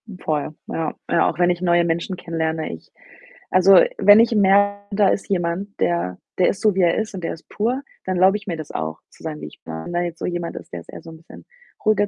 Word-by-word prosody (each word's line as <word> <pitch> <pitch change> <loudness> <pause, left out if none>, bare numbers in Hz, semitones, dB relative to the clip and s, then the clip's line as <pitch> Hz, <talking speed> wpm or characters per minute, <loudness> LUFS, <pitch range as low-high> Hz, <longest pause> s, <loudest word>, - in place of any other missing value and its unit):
Hm, 205 -4 -10
voll, 155 -2 -2
ja. 160 -1 -3 0.2
Ja, - - +3
auch - - -6
wenn 175 0 +4
ich 175 0 -1
neue 175 -1 +3
Menschen 170 +3 -1
kennenlerne, 160 -2 -3
ich - - -12 0.6
also, 185 0 +7 0.2
wenn 205 +3 +7
ich 230 0 +2
merke, 200 0 +2
da 200 -2 +4
ist 195 - -1
jemand, 190 +2 -2
der 90 +1 0 0.2
der 180 - +4
ist 195 - -3
so, 215 -2 +3
wie 190 - +1
er 170 -2 +3
ist 220 -1 -2
und 185 -3 -7
der 165 - -2
ist 160 - -13
pur, 245 +6 -1 0.2
dann 185 - -1
erlaube 190 +3 +4
ich 205 0 -16
mir 175 - -2
das 155 -2 -8
auch 80 0 -4
zu - - -21
sein, 155 -2 -5
wie - - -6
ich - - -15
bin. 80 - -7
Wenn 175 0 0
jetzt 170 -1 -6
so - - -3
jemand 175 -1 -3
ist, - - -10
der 85 - -4
ist 85 - -15
eher - - -9
so 165 - -11
'n 160 - -12
bisschen 165 - -15 0.4
ruhiger, 205 -1 +3
175 Hz, 260 wpm, -21 LUFS, 165-200 Hz, 0.6 s, also